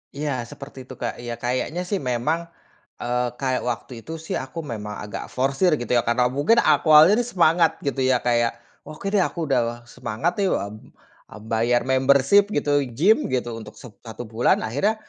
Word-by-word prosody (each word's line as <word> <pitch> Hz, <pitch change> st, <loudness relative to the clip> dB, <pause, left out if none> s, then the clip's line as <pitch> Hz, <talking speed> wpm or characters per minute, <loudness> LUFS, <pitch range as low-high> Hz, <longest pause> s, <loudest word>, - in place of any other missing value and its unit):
Iya 145 Hz, 0 st, -2 dB, 0.2 s
seperti 140 Hz, 0 st, -11 dB
itu -, -, -9 dB
Kak, 120 Hz, -, -3 dB
iya 120 Hz, -1 st, -5 dB
kayaknya 130 Hz, +8 st, -1 dB
sih 200 Hz, -, 0 dB
memang, 125 Hz, +5 st, -1 dB, 0.6 s
eee, 125 Hz, 0 st, 0 dB
kayak 130 Hz, -2 st, 0 dB
waktu 120 Hz, +2 st, -5 dB
itu -, -, -9 dB
sih -, -, -3 dB
aku 135 Hz, +5 st, -8 dB
memang 105 Hz, -2 st, -5 dB
agak 105 Hz, -, -6 dB
forsir 135 Hz, +8 st, +2 dB
gitu 120 Hz, -, -5 dB
ya -, -, +5 dB
karena 120 Hz, +1 st, +2 dB
mungkin 145 Hz, -, +2 dB
ak -, -, +4 dB
awalnya 155 Hz, +3 st, +8 dB
nih 240 Hz, -, -1 dB
semangat 165 Hz, -1 st, +4 dB
gitu 140 Hz, -1 st, -2 dB
ya 130 Hz, -, +4 dB
Kak, 120 Hz, -1 st, +2 dB
ya 115 Hz, -, +2 dB, 0.4 s
oke 155 Hz, +5 st, -10 dB
deh 205 Hz, -, +4 dB
aku -, -, -9 dB
udah 120 Hz, -2 st, 0 dB
semangat 120 Hz, +10 st, -2 dB
nih, 195 Hz, -, +2 dB
eee, 110 Hz, -, -7 dB
bayar 120 Hz, +2 st, +2 dB
membership 140 Hz, +8 st, +4 dB
gitu 145 Hz, -, 0 dB, 0.3 s
gym 205 Hz, +8 st, +4 dB
gitu 125 Hz, -2 st, -2 dB
untuk 110 Hz, -1 st, -11 dB
set 125 Hz, -, -12 dB, 0.2 s
satu 110 Hz, +2 st, -7 dB
bulan 115 Hz, +1 st, +1 dB
akhirnya, 145 Hz, -, 0 dB
130 Hz, 185 wpm, -23 LUFS, 120-155 Hz, 0.6 s, awalnya